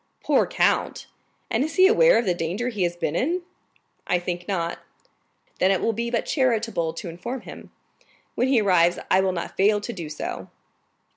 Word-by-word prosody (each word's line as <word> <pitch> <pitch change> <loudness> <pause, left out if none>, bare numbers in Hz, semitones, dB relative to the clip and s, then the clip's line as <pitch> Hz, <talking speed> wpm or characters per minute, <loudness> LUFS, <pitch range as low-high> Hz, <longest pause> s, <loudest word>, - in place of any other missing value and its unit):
"Poor - - +3
count! - - 0 0.5
And 230 +4 +2
is 315 - -4
he 375 - +6
aware 485 +5 +5
of 235 - +1
the 180 - +2
danger 175 +9 -2
he 210 -5 -5
has 175 -1 0
been 165 -2 -2
in?" 340 - 0 0.6
"I 180 - +2
think 175 0 -5
not." 170 -4 -2 0.8
"Then 185 - +3
it 195 -2 +2
will 230 - 0
be 235 +2 -3
but 235 -1 -1
charitable 230 - 0
to 175 - -6
inform 180 +10 -6
him. - - -11 0.6
When 250 - 0
he 260 -4 +3
arrives, 175 -3 +3
I 190 - +5
will 190 0 +1
not 170 -2 -5
fail 205 +2 +3
to 220 +4 -6
do 170 -6 -7
so." 155 - -6
200 Hz, 190 wpm, -24 LUFS, 175-240 Hz, 0.8 s, he